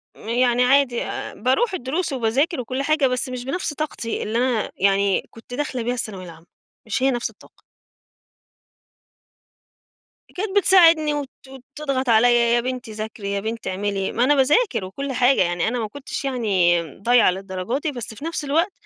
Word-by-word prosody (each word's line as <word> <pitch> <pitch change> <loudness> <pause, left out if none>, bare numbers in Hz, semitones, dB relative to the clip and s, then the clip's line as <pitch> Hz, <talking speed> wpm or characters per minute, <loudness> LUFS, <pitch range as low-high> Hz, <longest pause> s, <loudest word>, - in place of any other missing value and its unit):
يعني 245 +2 +1
عادي 255 -1 +3
آآ - - -5
باروح 320 - +1
الدُّرُوس 315 +3 -2
وباذاكر 265 +7 0
وكُلّ 255 +3 -3
حاجة، 305 -1 +2
بس 250 0 -2
مش 250 -1 -6
بنفس 295 +2 -3
طاقتي 290 -7 -4
اللي 220 +2 -2
أنا 245 -3 0
يعني 195 0 +2
كنت 230 +2 -14
داخلة 260 -3 -3
بيها 245 +2 -1
الثانوية 210 -6 -5
العامة، 165 -1 -13 0.4
مش 225 +4 -2
هي 270 - +4
نفس 240 -1 -2
الطاقة. - - -21 2.7
كانت 395 +1 -3
بتساعدني 330 -6 +5
وت 285 -2 -4 0.5
تضغط 275 -4 -2
عليّا، 235 +1 +4
يا 240 - +3
بنتي 250 -2 -5
ذاكري، 215 -2 -5
يا 200 - -1
بنتي 225 +2 -4
اعملي، 195 0 -2
ما 240 - +1
أنا 290 +3 +4
باذاكر 290 - +2
وكُلّ 275 +9 -5
حاجة، 255 +1 +3
يعني 175 +1 0
أنا 245 +2 -2
ما 220 -2 -2
كُنتش 280 +5 -7
يعني 195 -10 +2 0.2
ضايعة 240 -1 +4
للدرجة 190 +5 -4
دي، 295 +1 -3
بس 240 -3 -6
في 230 - -10
نفس 330 -1 -3
الوقت 330 +7 +1
245 Hz, 165 wpm, -22 LUFS, 220-280 Hz, 2.7 s, بتساعدني